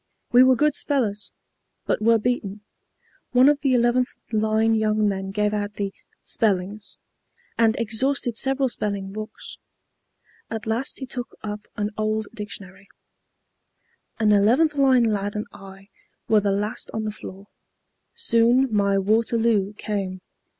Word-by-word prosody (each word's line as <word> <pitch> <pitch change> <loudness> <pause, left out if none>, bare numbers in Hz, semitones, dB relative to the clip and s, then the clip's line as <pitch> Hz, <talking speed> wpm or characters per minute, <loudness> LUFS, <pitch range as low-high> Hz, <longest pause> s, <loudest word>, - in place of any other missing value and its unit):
We 245 - +7
were 260 0 +6
good 300 +3 +2
spellers, 220 -9 -1 0.5
but - - 0
were 230 +1 +5
beaten. 215 -3 -2 0.7
One 250 +2 +6
of 290 0 +3
the 270 -2 +2
11th 245 +1 +2 0.2
line 220 +1 +2
young 215 -1 +2
men 195 -1 -2
gave 210 +1 0
out 205 0 -3
the 200 -1 -3 0.3
'spellings,' 205 0 -1 0.6
and 225 -1 +3
exhausted 235 +2 0
several 270 +2 +1
spelling 200 -4 -3
books. 215 +1 -8 0.9
At 225 -1 -5
last 225 +4 -2
he 265 - -5
took 250 -1 -7
up 210 0 -6
an 210 -1 -2
old 215 0 -1
dictionary. 200 -2 -9 1.3
An 215 -1 +2
11th 230 +10 +4
line 265 -3 +4
lad 205 -2 -1
and 210 - -3
I 195 0 -13 0.4
were 215 -1 +4
the 200 -1 +1
last 205 +2 -2
on 220 - -2
the 215 - -2
floor. 200 -1 -11 0.7
Soon 235 +2 +3
my 200 -1 +2
Waterloo 220 0 +1
came. 195 -3 -4
215 Hz, 135 wpm, -23 LUFS, 205-240 Hz, 1.3 s, We